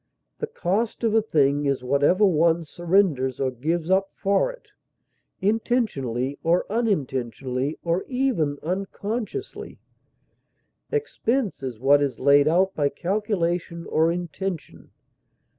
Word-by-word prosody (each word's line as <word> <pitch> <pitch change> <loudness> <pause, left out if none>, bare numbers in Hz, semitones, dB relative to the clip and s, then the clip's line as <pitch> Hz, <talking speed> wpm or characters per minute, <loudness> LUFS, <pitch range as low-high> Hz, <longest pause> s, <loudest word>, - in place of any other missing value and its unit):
The 450 - -2
cost 220 - -2
of 225 -2 +2
a 225 - +5
thing 145 -7 +2
is 135 -2 0
whatever 145 +10 +3
one 170 -2 +3
surrenders 165 -7 +1
or 130 -1 0
gives 160 +7 -2
up 195 +1 +3
for 200 - +1
it, - - -17 0.7
intentionally 170 - 0
or 170 +2 +2
unintentionally, 135 - -1
or 170 +2 0
even 250 - 0
unconsciously; 205 - -4 1.1
expense 270 - -1
is 125 -5 -5
what 140 +3 +4
is 140 -2 -1
laid 140 +2 +5
out 185 +4 +3
by 145 -2 +1
calculation 175 -1 -2
or 160 +1 +2
intention. 175 0 -5
170 Hz, 115 wpm, -24 LUFS, 140-205 Hz, 1.1 s, a